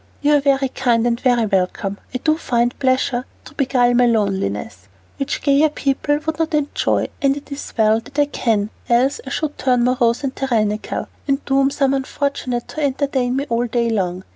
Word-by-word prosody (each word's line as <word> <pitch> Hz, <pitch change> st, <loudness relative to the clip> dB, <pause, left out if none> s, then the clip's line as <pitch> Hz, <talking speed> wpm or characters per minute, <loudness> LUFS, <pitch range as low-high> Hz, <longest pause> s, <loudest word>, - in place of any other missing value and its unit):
"You 295 Hz, +1 st, +4 dB
are -, -, +5 dB
very 275 Hz, -1 st, +2 dB
kind 240 Hz, -3 st, +1 dB
and 235 Hz, -1 st, +1 dB
very 245 Hz, -3 st, +2 dB
welcome. 195 Hz, 0 st, -1 dB
I 255 Hz, -, -2 dB
do 310 Hz, +4 st, +1 dB
find 240 Hz, -5 st, 0 dB
pleasures 255 Hz, -2 st, +1 dB, 0.2 s
to -, -, -12 dB
beguile 250 Hz, -4 st, +2 dB
my 245 Hz, 0 st, +4 dB
loneliness, 190 Hz, -, -1 dB, 0.3 s
which 275 Hz, -, -3 dB
gayer 285 Hz, +2 st, +4 dB
people 290 Hz, 0 st, 0 dB
would 320 Hz, 0 st, -2 dB
not 325 Hz, -1 st, 0 dB
enjoy, 295 Hz, -1 st, 0 dB
and 275 Hz, 0 st, +2 dB
it 290 Hz, 0 st, -11 dB
is 280 Hz, -, -6 dB
well 220 Hz, 0 st, +4 dB
that 260 Hz, +5 st, -14 dB
I 290 Hz, -, +4 dB
can, 220 Hz, -7 st, -1 dB, 0.2 s
else 260 Hz, -, +2 dB
I -, -, -3 dB
should 300 Hz, -2 st, -3 dB
turn 250 Hz, -2 st, +2 dB
morose 245 Hz, 0 st, +2 dB
and 270 Hz, -1 st, -2 dB
tyrannical, 215 Hz, -5 st, -1 dB, 0.2 s
and 275 Hz, 0 st, 0 dB
doom 270 Hz, 0 st, +3 dB
some 275 Hz, -1 st, +1 dB
unfortunate 265 Hz, -2 st, -2 dB
to 310 Hz, -, -5 dB
entertain 265 Hz, -2 st, 0 dB
me 275 Hz, +1 st, -1 dB
all 235 Hz, 0 st, 0 dB
day 235 Hz, 0 st, 0 dB
long." 185 Hz, -3 st, -1 dB
255 Hz, 190 wpm, -20 LUFS, 230-280 Hz, 0.3 s, are